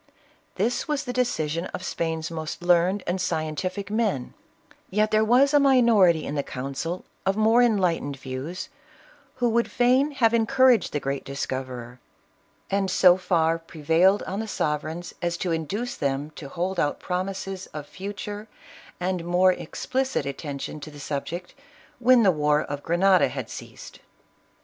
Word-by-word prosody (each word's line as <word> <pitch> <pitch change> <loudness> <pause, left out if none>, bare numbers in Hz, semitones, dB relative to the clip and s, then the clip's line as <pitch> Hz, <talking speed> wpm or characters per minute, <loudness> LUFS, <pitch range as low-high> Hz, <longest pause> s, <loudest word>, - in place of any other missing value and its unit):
This 225 +6 0
was 295 -1 -1
the 250 -3 -4
decision 170 -10 -1
of 185 - -7
Spain's 160 -2 -3
most 160 +1 -5
learned 180 +3 +3
and 180 +2 -1
scientific 185 +4 -2
men; 210 - -1 0.6
yet 215 +2 +1
there 215 0 +4
was 255 +6 +4
a 290 - +6
minority 230 - +5
in - - -4
the 145 - 0
council, 140 +7 -5 0.2
of 195 +1 0
more 220 +3 +5
enlightened 180 - +1
views, 135 +8 -6 0.7
who 245 -1 +1
would 235 +1 +1
fain 255 +4 +3
have 230 -4 +3
encouraged 250 +1 +4
the 145 - -1
great 140 0 -3
discoverer, 130 -3 -5 0.7
and 195 -1 +1
so 180 -1 +6
far 165 -3 +1
pre 165 -2 -13
vaile 180 +6 +4
I - - -6
on 195 - -2
the 220 - -3
sovereigns 155 -1 -3
as 170 -1 -1
to 180 - -2
induce 205 +10 -2
them 140 +1 -2
to 145 -2 -9
hold 180 +4 -2
out 145 - 0
promises 190 +1 -4
of 150 -1 -8
future 205 +4 -7 0.5
and 180 -1 -1
more 180 +2 +4
explicit 260 +10 -2
attention 140 +1 -5
to 150 - -8
the 145 -1 -12
subject, 155 +5 -5 0.5
when 250 -1 +5
the 195 - +6
war 150 -1 +2
of 145 0 -5
Grenada 180 +3 +4
had - - -6
ceased. - - -10
180 Hz, 155 wpm, -25 LUFS, 155-215 Hz, 0.7 s, a